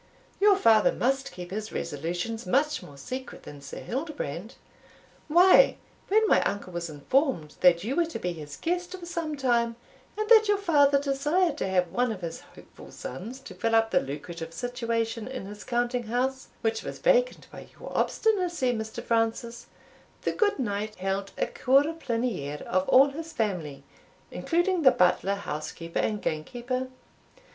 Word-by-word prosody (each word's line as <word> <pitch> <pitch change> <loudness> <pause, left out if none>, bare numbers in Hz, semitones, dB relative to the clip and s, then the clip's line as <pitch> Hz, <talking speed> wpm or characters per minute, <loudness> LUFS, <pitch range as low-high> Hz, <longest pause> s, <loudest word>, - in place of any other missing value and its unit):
your 410 0 +6
father 225 - +5
must 270 +2 0
keep 180 0 -9
his 215 +2 -4
resolutions 175 +9 -4
much 295 +8 +1
more 140 - -13
secret 255 - -7
than 145 -1 -10
Sir 140 - -8
Hildebrand. 245 - -5 0.7
Why, 365 +9 +6 0.3
when 435 +2 +3
my - - +5
uncle 200 -3 -3
was 170 -1 -4
informed 155 - 0
that 175 -1 +5
you 245 +6 -2
were 345 -1 +2
to 330 - -5
be 180 -1 -3
his 150 -3 -9
guest 355 +2 -2
for 345 - -9
some 330 -3 -3
time, 235 -3 +1 0.4
and 430 0 -1
that 440 -2 +7
your 410 0 +3
father 285 -7 +4
desired 295 +4 +1
to - - -1
have 180 -2 +1
one 245 -1 +1
of 200 -4 -6
his 165 -1 -5
hopeful - - -15
sons 220 - -7
to 200 - -10
fill 225 +5 0
up 225 0 +3
the 180 - +4
lucrative 165 +4 -7
situation 230 -2 -2
in 255 -6 -6
his 205 +1 -9
counting 240 -1 -1
house 260 +3 -1
which 225 -1 0
was - - -6
vacant - - +2
by - - -10
your - - -8
obstinacy, 355 - +1
Mr. 220 -1 -5
Francis, 230 +1 -1 0.6
the - - +1
good 420 -2 +1
knight 215 -3 -2
held 195 +1 -3
a - - +1
cour 270 +2 +3
ple'nie're 230 - -3
of 185 +1 0
all 270 +2 +7
his 320 +3 -7
family, 175 -10 -2 0.5
including 350 +1 0
the 270 - +8
butler, 195 -2 +2
housekeeper, 165 -2 -5
and 210 -2 -1
gamekeeper. 245 +11 -3
235 Hz, 165 wpm, -27 LUFS, 185-290 Hz, 0.7 s, the